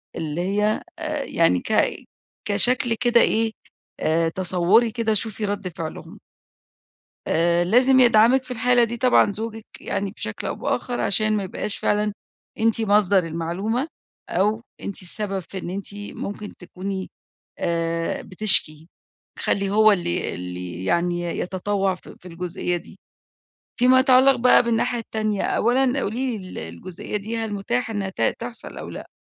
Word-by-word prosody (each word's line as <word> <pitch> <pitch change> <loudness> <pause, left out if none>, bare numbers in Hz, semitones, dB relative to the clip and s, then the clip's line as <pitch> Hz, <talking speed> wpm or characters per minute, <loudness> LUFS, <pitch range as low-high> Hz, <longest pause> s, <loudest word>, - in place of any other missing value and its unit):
اللي 155 +1 -3
هي 210 +3 0 0.2
آآ 305 -3 -3
يعني 165 - +2
ك - - -4 0.7
كشكل 240 +3 +3
كده 240 -1 +4
إيه، 225 0 +2 0.5
آآ 165 +1 +1
تَصوّري 185 +6 +2
كده، 225 -1 0
شوفي 215 0 -1
رد 205 -1 -3
فعلهم. 165 -2 -8 1.1
آآ 170 +1 +2
لازم 255 +7 +5
يدعمِك 240 +2 +5
في - - -16
الحالة 245 0 +3
دي 235 +1 -4
طبعًا 245 -4 +3
زوجك 225 +1 -6 0.2
يعني 200 0 -3
بشكل 215 - -6
أو - - -2
بآخر، 245 -1 -3
عشان 215 +2 +2
ما 205 - -1
يبقاش 195 +2 -2
فعلًا 210 0 0 0.5
أنتِ 225 0 +2
مصدر 200 -4 +3
المعلومة، 185 - -2 0.4
أو 210 +5 +1 0.2
أنتِ 200 -1 -3
السبب 195 +2 -3
في 190 +1 -8
إن 175 - -6
أنتِ 200 +2 -5
ممكن 205 0 -7
تكوني 190 +1 -6 0.5
آآ، 165 -1 -1
بتشكي، 175 -6 +4 0.5
خلّي 195 -1 0
هو 215 +1 +5
اللي 175 - -1
اللي 90 0 -6
يعني 175 - 0
يتطوع 190 +3 -1
في 180 - -14
في 180 - -12
الجزئية 175 0 -3
دي. 175 +5 -11 0.8
فيما 255 +1 +5
يتعلق 260 0 +5
بقى 250 +1 +5
بالناحية 235 +1 0
التانية 215 -2 -2
أولًا 255 +3 +1
قولي 240 +1 -2
لي 185 -2 -10
ال - - -8 0.2
الجزئية 180 - -6
دي 215 +3 -4
هل 225 -2 -3
متاحة 225 +4 -2
إنّها 200 -2 -2
ت - - -11 0.2
تحصل 235 0 -8
أو - - -7
لأ؟ - - -8
205 Hz, 145 wpm, -23 LUFS, 180-230 Hz, 1.1 s, لازم